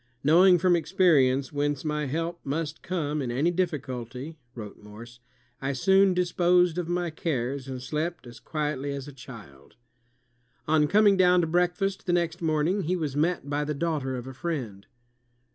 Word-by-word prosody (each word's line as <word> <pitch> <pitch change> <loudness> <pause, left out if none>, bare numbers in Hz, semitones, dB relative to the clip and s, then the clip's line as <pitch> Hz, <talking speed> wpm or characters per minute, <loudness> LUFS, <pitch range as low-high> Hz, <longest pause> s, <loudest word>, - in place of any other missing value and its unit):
"Knowing 180 +5 +6
from 175 +1 +3
experience 150 -7 +2
whence 145 0 -1
my 150 0 -1
help 165 +4 -3
must 150 +2 -3
come 155 -5 -2
in 130 - -3
any 140 +8 +1
difficulty," 140 -5 -4 0.2
wrote 105 -4 -9
Morse, 115 +3 -12 0.4
"I 135 +1 -1
soon 190 +6 +3
disposed 180 -1 +2
of 170 -1 -4
my 175 -1 -1
cares, 135 -4 -3
and 130 -1 -5
slept 150 +2 -4
as 120 -1 -12
quietly 145 -3 -3
as 140 0 -6
a 145 - -10
child." 110 - -13 0.9
On 155 -1 +3
coming 205 +2 +4
down 180 -1 +5
to - - +1
breakfast 180 +4 0
the 175 - +2
next 175 0 -1
morning, 160 +4 +1
he 180 +4 0
was 155 -6 -3
met 160 0 0
by 145 +1 -1
the 150 0 -3
daughter 145 -4 -2
of 125 -1 -6
a 130 - -8
friend. 125 - -5
150 Hz, 165 wpm, -26 LUFS, 135-175 Hz, 0.9 s, Knowing